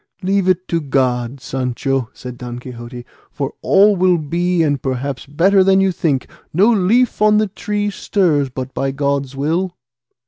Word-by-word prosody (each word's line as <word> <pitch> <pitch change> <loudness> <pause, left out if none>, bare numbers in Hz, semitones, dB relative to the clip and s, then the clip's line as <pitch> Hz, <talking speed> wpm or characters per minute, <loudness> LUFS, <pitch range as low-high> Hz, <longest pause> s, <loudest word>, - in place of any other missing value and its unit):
"Leave 190 0 +1
it 185 0 +1
to 165 -1 -1
God, 130 -2 -1
Sancho," 130 0 -2
said 125 -1 -9
Don 120 0 -7
Quixote, 120 0 -9 0.2
"for 140 -1 -4
all 205 +1 +5
will 180 -1 +3
be 170 +3 0
and 145 -4 0
perhaps 130 0 -3
better 185 +7 +3
than 190 0 +4
you 195 0 +3
think; 150 -6 -1 0.2
no 200 +8 +4
leaf 220 +5 +2
on 210 0 +5
the 215 - +3
tree 205 +1 -3
stirs 165 -10 +1
but 130 +1 -6
by 135 - -1
God's 140 -1 -2
will." 170 +6 -1
150 Hz, 165 wpm, -18 LUFS, 130-190 Hz, 0.2 s, all